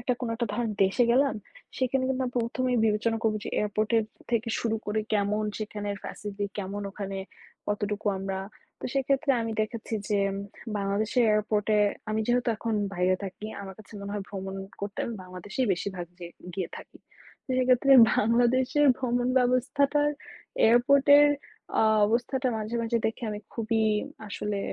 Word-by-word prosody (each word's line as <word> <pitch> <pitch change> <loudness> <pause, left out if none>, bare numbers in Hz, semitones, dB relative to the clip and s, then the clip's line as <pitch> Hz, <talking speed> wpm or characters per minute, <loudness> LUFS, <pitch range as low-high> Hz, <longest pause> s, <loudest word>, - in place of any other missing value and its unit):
একটা 250 +1 0
কোন 245 - -2
একটা 235 +1 -1
ধরেন 225 +1 -1
দেশে 195 +6 +3
গেলাম। 275 +2 +3 0.4
সেখানে 260 0 +1
কিন্তু 265 - 0
আমরা 250 - -4
১ম 240 +2 -1
এই 245 - +2
বিবেচনা 220 +1 +1
করবো 220 -2 +2
যে - - -4
এয়ারপোর্টের 215 +2 +1 0.3
থেকে 235 -1 +1
শুরু 225 -1 0
করে 210 +1 0
কেমন, 210 +1 +1
সেখানের 205 -1 -4
facility 205 0 -4
কেমন? 200 +1 -4
ওখানে 195 -1 -5 0.5
কতটুকু 205 0 -2
আমরা 195 0 -3 0.4
তো - - -8
সেক্ষেত্রে 275 +2 +1
আমি 225 0 -3
দেখেছি 220 +1 -3
যে 205 - +2 0.6
বাংলাদেশের 205 +5 +1
এয়ারপোর্টে 210 0 +1 0.3
আমি 215 0 0
যেহেতু 245 0 +2
এখন 225 +1 -2 0.2
বাইরে 180 +1 +2
থাকি। 195 +2 -6
আমার 195 -1 -8
কাছে 215 - -14
মনে 200 0 -5
হয় 205 -2 -3
ভ্রমণ 190 -1 -5 0.3
করতে 200 0 -5
আমি 235 - -4
বাংলাদেশেই 185 +7 -3
বেশিরভাগ 180 -1 -4
যে 175 - -7 0.3
গিয়ে 185 -4 -2
থাকি। - - -13 0.5
তো - - -55
সেক্ষেত্রে 255 +1 +4 0.3
বাংলাদেশের 250 +5 +3
ভ্রমণ 245 -1 0
ব্যবস্থাটার 275 +4 +2 0.6
এয়ারপোর্টের 280 +5 +6 0.5
আ - - +5 0.2
অবস্থাটা 250 +4 0
মাঝে, 215 +2 -4
মাঝে 230 0 +1
দেখে 225 - -4
আমি 210 0 -5
খুবই 225 -1 0 0.5
আসলে 205 0 -3
220 Hz, 155 wpm, -27 LUFS, 205-245 Hz, 0.6 s, এয়ারপোর্টের